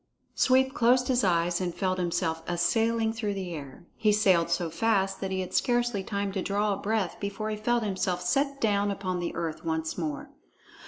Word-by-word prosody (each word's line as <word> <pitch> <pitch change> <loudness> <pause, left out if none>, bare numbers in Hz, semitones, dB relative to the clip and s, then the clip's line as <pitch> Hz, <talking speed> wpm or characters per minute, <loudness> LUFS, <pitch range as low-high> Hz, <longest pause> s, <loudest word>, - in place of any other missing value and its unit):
Sweep 265 +1 +3
closed 250 +1 +3
his 255 -2 +2
eyes 175 -1 +2
and 175 -2 -2
felt 185 -1 -1
himself 170 -2 -1
a 175 - -1
sailing 225 +4 +1
through 215 -3 -2
the 185 -3 -4
air. 140 0 -9
He 215 -1 +2
sailed 190 -5 +3
so 170 -1 -1
fast 195 +1 +1
that 195 - -2
he 190 0 -1
had 185 - -6
scarcely 240 -4 +1
time 200 0 -2
to 190 -1 -2
draw 205 +2 0
a - - -3
breath 210 -3 -1
before 210 +2 -3
he - - -1
felt 235 +2 0
himself 190 -3 -1
set 275 +9 0
down 205 -3 +2
upon 190 -2 -2
the 175 - -3
earth 160 -2 -4
once 160 0 -2
more. 150 -4 -4
195 Hz, 200 wpm, -28 LUFS, 175-220 Hz, -, Sweep